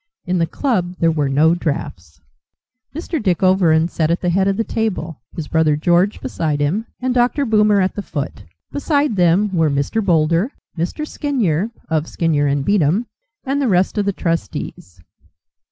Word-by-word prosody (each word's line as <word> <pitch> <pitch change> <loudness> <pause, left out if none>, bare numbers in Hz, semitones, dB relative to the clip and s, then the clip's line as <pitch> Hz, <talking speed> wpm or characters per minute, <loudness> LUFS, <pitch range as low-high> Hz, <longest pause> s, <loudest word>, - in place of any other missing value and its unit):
In 180 0 0
the 165 - +1
club 185 - -1
there 165 -1 +2
were 150 -3 0
no 155 +4 +4
draughts. 90 - -4 0.8
Mr. 325 0 -3
Dick 185 -4 0
Overend 170 -3 +3
sat 160 -2 0
at 170 - 0
the 180 - +1
head 190 +2 +2
of 195 0 +1
the 225 - +1
table, 185 - -3
his 160 -4 -5
brother 160 -2 +2
George 175 +6 +2
beside 155 -3 -2
him, 180 +11 -1
and 255 0 -1
Dr. 250 +4 +2
Boomer 210 -3 +3
at 190 0 +1
the 205 - -4
foot. 140 - -5 0.3
Beside 285 -4 0
them 185 +2 +2
were 160 -2 +3
Mr. 140 +10 -1
Boulder, 170 - +2 0.2
Mr. 185 - -3
Skinyer 225 - -1 0.2
(of 160 -2 0
Skinyer 145 -4 +1
and 140 -1 -1
Beatem) 200 +2 +2 0.4
and 275 +2 -1
the 270 - +1
rest 185 -3 +2
of 205 - 0
the 200 - +1
trustees. 100 - -4
175 Hz, 170 wpm, -19 LUFS, 155-210 Hz, 0.8 s, no